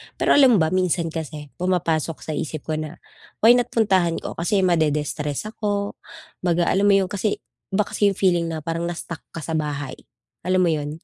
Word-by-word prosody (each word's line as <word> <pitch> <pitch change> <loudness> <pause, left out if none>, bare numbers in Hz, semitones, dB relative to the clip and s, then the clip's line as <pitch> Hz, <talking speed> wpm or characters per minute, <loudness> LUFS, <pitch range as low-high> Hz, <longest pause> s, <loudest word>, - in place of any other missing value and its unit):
Pero - - +1
alam 265 -4 +7
mo - - +4
ba, 160 - 0
minsan 180 -3 +1
kasi 150 -3 -6
pumapasok 165 -3 0
sa - - -5
isip 155 0 -4
ko 155 0 0
na, 155 +1 -6 0.5
"Why 225 - +9
not 245 0 +4
puntahan 190 -7 +2
ko?" - - -5
kasi 190 +3 +1
ma-de-destress 150 -4 0
ako, 205 -2 -2 0.4
kumbaga, 175 -1 +1
alam 200 +2 +3
mo 200 - +6
'yong 190 -2 +1
kasi, 205 +1 -1 0.3
iba 205 +2 +2
kasi 205 0 +1
'yong 195 - 0
feeling 175 -3 +2
na 160 -2 -4
parang 165 +1 -2
na-stuck 170 -1 -5 0.2
ka 165 - -5
sa 165 - -5
bahay. 145 -4 -3 0.5
Alam 185 0 +3
mo 175 - +3
'yon, 150 +1 -4
170 Hz, 195 wpm, -23 LUFS, 155-195 Hz, 0.5 s, Why